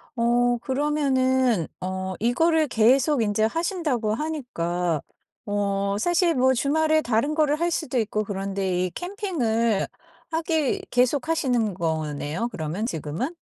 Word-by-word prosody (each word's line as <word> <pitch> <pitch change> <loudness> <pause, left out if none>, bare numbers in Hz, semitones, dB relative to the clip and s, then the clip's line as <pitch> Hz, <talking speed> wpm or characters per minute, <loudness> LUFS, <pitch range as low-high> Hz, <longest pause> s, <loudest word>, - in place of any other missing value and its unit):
어 240 0 +2
그러면은 260 - +1
어 185 0 -3
이거를 310 +7 +2
계속 255 +4 +3
인제 215 +1 +1
하신다고 300 - -1
하니까 180 - -2 0.4
어 200 -1 0
사실 345 - +2
뭐 260 +1 +4
주말에 310 +4 +2
다른 245 +4 0
거를 305 -1 +2
할 345 0 +1
수도 265 -6 -2
있고 215 -2 0
그런데 195 -2 -2
이 - - -2
캠핑을 245 - -1 0.4
하기 320 -3 0
계속 250 +3 +2
하시는 245 - +1
거네요, 160 +4 -2
그러면 170 +5 -3
지금은? 165 - -3
240 Hz, 265 characters per minute, -24 LUFS, 200-300 Hz, 0.4 s, 뭐